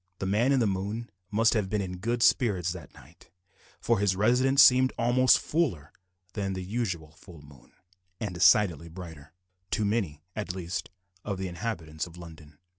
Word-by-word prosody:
The 95 - -4
man 110 +7 +2
in 135 - +3
the 115 - +2
moon 100 +4 -3 0.2
must 115 +2 +3
have 105 -4 -1
been 105 - -1
in 90 -2 -5
good 115 +4 -1
spirits 95 -8 +2
that 85 -7 -11
night, 75 +7 -18 0.5
for 115 -3 +1
his 100 -2 +2
residence 130 +7 +4
seemed 130 -1 +5
almost 125 +2 +4
fuller 115 - -2 0.4
than 100 -3 -3
the 95 -1 -5
usual 90 -7 -3
full 80 -1 -15
moon, 70 -3 -18 0.5
and 105 -4 -4
decidedly 85 -2 +3
brighter 80 -4 -11 0.4
to 105 - 0
many, 95 -9 -2
at 100 -4 -4
least, 90 0 -5 0.3
of 100 -2 -3
the 95 0 -3
inhabitants 85 -4 -5
of 85 0 -14
London. 80 -3 -13
95 Hz, 170 wpm, -28 LUFS, 85-115 Hz, 0.5 s, seemed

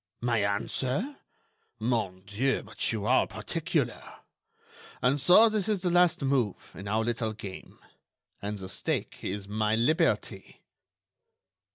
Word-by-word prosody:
"My 120 -2 +1
answer? 130 - -1 0.6
Mon 110 -5 -1
dieu! 115 +8 0
but - - -1
you 110 -3 -3
are - - +4
particular!... - - -2 1.0
And 130 +3 +2
so 185 +10 +7
this 215 -2 0
is 200 -4 0
the 180 - +1
last 175 -4 +4
move 130 -7 0
in 95 +2 -8
our 110 +2 +1
little 115 -1 -1
game—and 100 +1 -10
the 95 -1 -7
stake - - -3
is 100 +1 -4
my 105 +1 +1
liberty!" 120 +8 0
115 Hz, 125 wpm, -29 LUFS, 105-140 Hz, 1.0 s, so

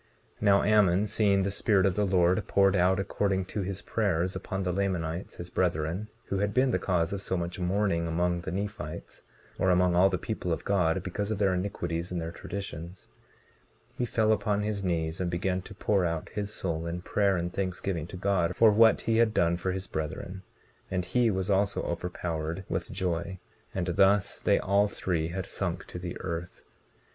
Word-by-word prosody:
19:14 - - -27
Now 100 -2 +5
Ammon 105 -2 +4
seeing 100 -2 +2
the 100 - -1
Spirit 100 -1 +2
of 95 - +3
the 105 +1 +1
Lord 90 -1 +2
poured 100 -1 +4
out 95 +1 +3
according 95 -1 0
to 105 - -4
his 95 0 -4
prayers 95 -4 0
upon 95 -1 -3
the 90 - 0
Lamanites, 90 -3 -2
his 85 +1 -8
brethren, 85 +3 0 0.2
who 95 - -2
had 105 0 -1
been 130 0 +4
the - - +1
cause 85 -2 0
of 100 - -3
so 95 - -1
much 85 +1 -4
mourning 90 -2 +1
among 85 +1 0
the - - -5
Nephites, 95 -4 -5 0.4
or 95 - +3
among 90 0 +4
all 90 +2 +5
the - - 0
people - - -3
of - - -2
God 90 -3 +1
because 100 +3 -3
of 110 - -1
their 100 -2 +2
iniquities 90 -2 -2
and 90 - -2
their 80 0 -4
traditions, 90 -1 -7 0.9
he - - -2
fell 110 -2 +2
upon 105 -1 +1
his 105 -2 -2
knees, 80 -2 -1
and 90 - 0
began 90 +1 -1
to 100 - -11
pour 100 -1 +1
out 85 -2 -2
his 105 0 -4
soul 85 -5 -2
in 85 +1 -4
prayer 100 -2 +2
and 85 +1 -3
thanksgiving 90 -3 -2
to 90 - -8
God 90 -3 +1
for 115 -1 +6
what 110 +2 +5
he 115 -1 +1
had 115 -2 +3
done 85 0 +3
for 95 +2 -2
his 95 +1 -4
brethren; 85 +4 -5 0.5
and 90 -1 -1
he 120 +2 +2
was 95 -1 -1
also 100 +1 +1
overpowered 85 0 -3
with - - -3
joy; 90 +1 -2 0.3
and 95 -2 -2
thus 95 +3 +3
they - - +3
all 100 +2 +2
three 85 -5 -1
had 90 +2 -4
sunk 90 -1 -3
to 90 - -8
the 90 0 -6
earth. 85 -1 -5
95 Hz, 195 wpm, -28 LUFS, 85-100 Hz, 0.9 s, for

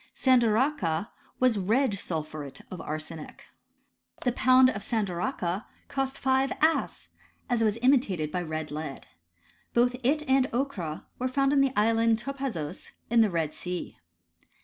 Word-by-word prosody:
Sandaracha 230 - +2 0.3
was 250 -5 +3
red 225 +7 +2
sulphuret 155 -5 -5
of 185 - -6
arsenic. 155 +1 -7 0.8
The 250 - +1
pound 255 +1 +5
of 205 - -5
sandaracha 190 -3 -2 0.2
cost 270 -1 -2
5 265 0 +2
as.: 320 +1 +1 0.4
it 240 -2 +2
was 215 -1 +2
imitated 205 - +2
by 180 - -1
red 155 -2 -4
lead. 150 -2 -6 0.7
Both 245 +1 +3
it 295 +5 +2
and 265 0 +3
ochra 225 - -3
were 255 - 0
found 275 +2 +2
in 280 - +5
the 275 -1 +3
island 225 +1 +3
Topazos 240 - -5 0.2
in 235 -1 +6
the 220 - +4
Red 165 -4 -1
Sea. 180 -1 -5
225 Hz, 135 wpm, -28 LUFS, 170-260 Hz, 0.8 s, in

